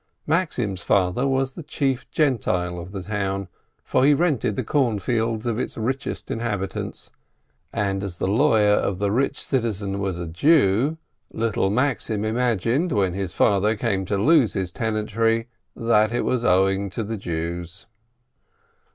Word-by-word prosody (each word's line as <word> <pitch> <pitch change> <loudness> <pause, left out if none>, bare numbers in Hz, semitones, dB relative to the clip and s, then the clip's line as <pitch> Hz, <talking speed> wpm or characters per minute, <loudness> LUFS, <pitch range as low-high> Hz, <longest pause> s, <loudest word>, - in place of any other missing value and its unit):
Maxim's 130 - 0
father 100 +9 +1
was 135 0 0
the 170 - -9
chief 135 -3 -2
Gentile 90 - 0
of 85 +2 -8
the 95 -2 -6
town, 100 -2 -2 0.4
for - - +1
he 145 +1 +6
rented 140 - +1
the - - -2
corn 130 -7 +1
fields 115 +2 -1
of 120 -1 -1
its - - -4
richest 130 +5 -3
inhabitant; 105 -4 -4 0.6
and 100 -1 -1
as 95 -3 -5
the - - -2
lawyer 105 0 +4
of 100 -2 0
the 100 +1 0
rich 135 +5 0
citizen 105 -6 -2
was 95 -3 -2
a 85 -1 -5
Jew, 135 - +3 0.3
little 110 -3 0
Maxim 115 -2 0
imagined, 120 - +1
when 95 -6 +1
his 95 -3 -4
father 105 +2 +3
came 100 -2 -1
to 100 +2 -1
lose 140 +2 +4
his 95 -2 -2
tenantry, 115 +2 0 0.3
that 110 -1 +2
it 120 - 0
was 125 -2 0
owing 95 +1 +2
to 110 +5 -4
the 110 +2 -4
Jews. 85 +2 -5
110 Hz, 150 wpm, -23 LUFS, 95-125 Hz, 0.6 s, he